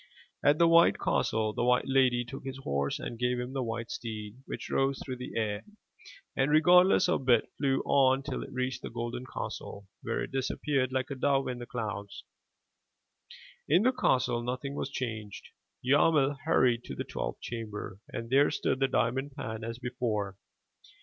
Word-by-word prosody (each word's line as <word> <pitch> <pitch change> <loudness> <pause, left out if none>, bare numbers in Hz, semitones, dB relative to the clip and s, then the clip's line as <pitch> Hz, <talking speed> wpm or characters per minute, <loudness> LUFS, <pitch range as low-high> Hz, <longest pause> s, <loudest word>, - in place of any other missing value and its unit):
At 145 +1 +5
the 170 - +5
white 170 0 +6
castle 110 -3 0
the - - -1
white 125 0 +3
lady 130 -2 +3
took 135 +3 -8
his 135 0 -5
horse 70 - -1
and 115 - -6
gave 125 0 +1
him 125 +2 -5
the 135 - -1
white 115 -1 -4
steed, 110 -1 -6
which - - -5
rose 135 0 +1
through 130 -2 -4
the 125 +1 -7
air, 105 -2 -1 0.7
and 135 +1 +2
regardless 180 +6 +6
of 175 -6 +1
bit, 120 -3 +4
flew 135 -1 +2
on 135 -1 +4
till - - -4
it - - -8
reached 130 -1 -2
the - - -6
golden 120 +2 -5
castle, 100 -1 -6
where - - -2
it - - -6
disappeared 135 0 0
like 130 +1 -1
a - - -2
dove 135 +1 +1
in 125 -1 -4
the 120 - -7
clouds. 100 -4 -5 1.5
In 175 +7 +5
the 255 - +5
castle 130 - +1
nothing 125 +3 -3
was 140 - -3
changed. 110 -6 -5 0.4
Yarmil 145 +1 +4
hurried 125 -7 +3
to - - -6
the - - -3
twelfth - - -4
chamber 105 -4 -6
and 115 -1 -6
there 140 +2 +5
stood 130 - -1
the 135 - +3
diamond 135 +3 0
pan 110 0 -5
as 115 +1 -4
before. 120 -6 -2
125 Hz, 175 wpm, -30 LUFS, 115-135 Hz, 1.5 s, white